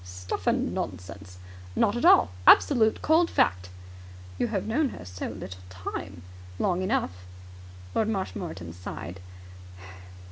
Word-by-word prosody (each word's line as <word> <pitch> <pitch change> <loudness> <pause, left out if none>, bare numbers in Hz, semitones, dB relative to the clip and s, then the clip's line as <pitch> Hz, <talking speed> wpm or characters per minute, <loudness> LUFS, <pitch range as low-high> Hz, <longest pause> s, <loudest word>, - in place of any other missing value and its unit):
"Stuff 90 0 -6
and - - +1
nonsense!" 90 0 -6 0.4
"Not - - +2
at - - -1
all. 90 - +6 0.2
Absolute, 225 -6 +6
cold 330 +2 +4
fact." 90 0 +1 0.7
"You - - +1
have 205 -5 -2
known 270 +6 +1
her 90 - -10
so 90 +1 -6
little 95 -3 -8
time." 90 0 -7 0.3
"Long 180 - 0
enough." 235 +8 0 0.8
Lord 220 -1 +1
Marshmoreton 175 - -4
sighed. 90 0 -7
95 Hz, 120 wpm, -27 LUFS, -, 0.8 s, all